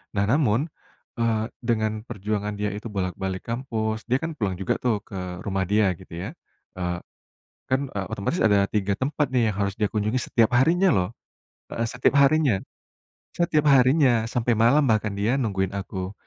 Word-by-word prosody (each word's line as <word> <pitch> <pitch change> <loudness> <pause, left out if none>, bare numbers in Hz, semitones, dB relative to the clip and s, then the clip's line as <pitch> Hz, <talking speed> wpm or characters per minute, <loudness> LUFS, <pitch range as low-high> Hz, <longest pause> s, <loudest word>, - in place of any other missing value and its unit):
Nah, 100 - +2
namun, 135 +2 +2 0.5
eee, 115 -2 +1 0.2
dengan 110 -3 0 0.2
perjuangan 105 -1 -3
dia 105 0 -1
itu 105 +3 -6
bolak-balik 95 -2 -3
kampus, 110 -3 -3
dia 125 +2 +2
kan 165 - -2
pulang 100 -6 -1
juga 95 0 -2
tuh 110 -5 0
ke 90 -2 -6
rumah 95 -2 -1
dia 105 -1 +3
gitu - - -14
ya, 90 +5 -5 0.5
eee, 90 -1 -2 0.7
kan, 130 - +3
eee, 100 -2 -2
otomatis 100 - -2
ada 100 -2 +4
3 100 -1 -1
tempat 145 +1 0
nih 120 -4 +2
yang 95 - -9
harus 100 0 -1
dia 105 - +2
kunjungi 110 +3 0
setiap 115 -2 +2
harinya 175 +8 +4
loh. 90 - +2 0.7
Heeh, 115 0 -1
setiap 125 +3 +1
harinya. 140 -7 +3 0.7
Setiap 155 -3 +1
harinya, 130 -3 +5
sampai 120 0 +1
malam 120 +7 +4
bahkan 110 -2 +2
dia 110 +6 +1
nungguin 95 -5 -1
aku, 95 -1 -5
110 Hz, 165 wpm, -25 LUFS, 100-125 Hz, 0.7 s, harinya